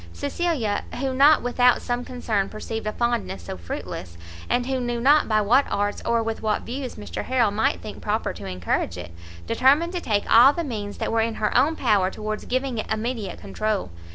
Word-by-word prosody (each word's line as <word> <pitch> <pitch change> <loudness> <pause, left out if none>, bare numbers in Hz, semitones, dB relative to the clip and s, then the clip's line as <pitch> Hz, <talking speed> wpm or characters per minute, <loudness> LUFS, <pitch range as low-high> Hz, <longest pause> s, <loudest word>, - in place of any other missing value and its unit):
Cecilia, 230 - -1 0.2
who 265 0 -1
not 285 +4 +5
without 245 0 +3
some 245 0 -2
concern 225 -6 -2
perceived 220 0 -5
a - - 0
fondness 235 - -2
so 85 - -6
fruitless, 85 0 -7 0.3
and 245 0 +1
who 265 0 -1
knew 240 -1 -2
not 290 +5 +4
by 215 -1 +3
what 245 +7 +3
arts 205 0 -1
or 230 -1 +1
with 225 0 -3
what 215 -1 0
views 255 +1 -5
Mr 210 - -6
Harrel 245 -5 +2
might 215 +2 0
think 210 - -8
proper 215 +2 -1
to 100 - -8
encourage 90 -1 -2
it, 90 -1 -8 0.3
determined 285 - +3
to 355 - -2
take 210 -7 0
all 250 +5 +7
the 340 - -2
means 210 -8 -5
that - - -2
were 225 0 +2
in 225 0 -1
her 210 - -1
own 315 +4 +4
power 205 -9 +2
towards 215 +2 -5
giving 255 -2 -1
it 215 - -5
immediate 220 -1 -3
control. 205 - -2
225 Hz, 200 wpm, -24 LUFS, 205-255 Hz, 0.3 s, all